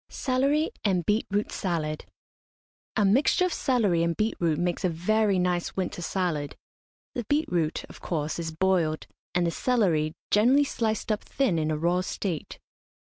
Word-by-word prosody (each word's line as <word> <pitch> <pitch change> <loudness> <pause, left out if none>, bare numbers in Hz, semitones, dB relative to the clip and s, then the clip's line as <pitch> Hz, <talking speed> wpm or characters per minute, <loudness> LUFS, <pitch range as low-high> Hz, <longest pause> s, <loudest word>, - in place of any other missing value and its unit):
CELERY 275 +4 +1
AND 185 -5 +1
BEET 210 +2 +1
ROOT 205 +1 -1
SALAD. 160 -5 -2 0.9
A 210 - +3
mixture 265 - +3
of 365 - -1
celery 215 - +2
and 170 -1 0
beet 215 +1 +1
root 165 -3 +1
makes 175 0 -1
a 185 - +3
very 200 +4 +1
nice 180 -1 0
winter 185 -2 -3
salad. 170 -5 -2 0.6
The 245 - -3
beet 295 +7 +1
root, 165 -3 0
of - - -13
course, 155 -1 -2
is 165 -1 -3
boiled, 165 -2 +1 0.3
and 175 -1 +3
the 170 - +1
celery 170 -10 +1 0.2
generally 250 +7 +5
sliced 220 -5 -1
up 210 - -1
thin 250 -12 0
in 155 0 0
a 155 - 0
raw 175 +3 +1
state. 185 -3 -4
185 Hz, 165 wpm, -27 LUFS, 165-220 Hz, 0.9 s, generally